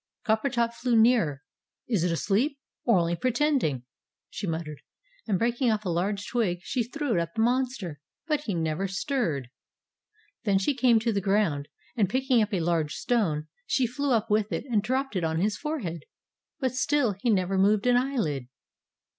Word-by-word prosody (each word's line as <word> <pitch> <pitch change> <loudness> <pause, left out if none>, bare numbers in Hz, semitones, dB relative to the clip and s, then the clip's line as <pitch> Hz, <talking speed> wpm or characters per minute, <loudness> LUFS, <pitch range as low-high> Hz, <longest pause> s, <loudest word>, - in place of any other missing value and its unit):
Coppertop 235 +1 +1
flew 240 0 0
nearer. 220 - +3 0.4
"Is 215 -9 +1
it 180 - +1
asleep, 215 - +1 0.3
or 230 -5 +5
only 170 0 +1
pretending?" 250 - +1 0.5
she 200 - -4
muttered, 160 -3 -4 0.5
and 200 -4 +2
breaking 240 +4 +1
off 215 -1 0
a - - -1
large 195 +4 -1
twig, 220 -8 0
she 255 - -1
threw 285 +2 -2
it 175 - +2
at 170 0 -5
the 220 - +1
monster. 240 - -1 0.2
But 305 -2 +1
he 205 - -1
never 165 +3 -1
stirred. 190 - -2 0.9
Then 200 -3 +3
she 195 +9 +1
came 250 -3 +4
to 230 0 0
the 200 - 0
ground, 190 -8 +1 0.3
and, 205 -6 +2
picking 260 +1 +2
up 215 +1 0
a 190 -4 0
large 160 -3 0
stone, 165 -11 0 0.2
she 260 - +2
flew 275 +4 -2
up 225 -2 +2
with 210 0 +2
it - - -2
and 215 -3 +3
dropped 260 +2 -1
it 180 - 0
on 160 0 0
to 165 - +1
his 210 0 +1
forehead. 200 - -4 0.5
But 260 -4 0
still 255 -3 +1
he 240 - 0
never 190 -2 +2
moved 205 +2 +3
an 245 0 +4
eyelid. 225 - 0
215 Hz, 180 wpm, -27 LUFS, 175-250 Hz, 0.9 s, or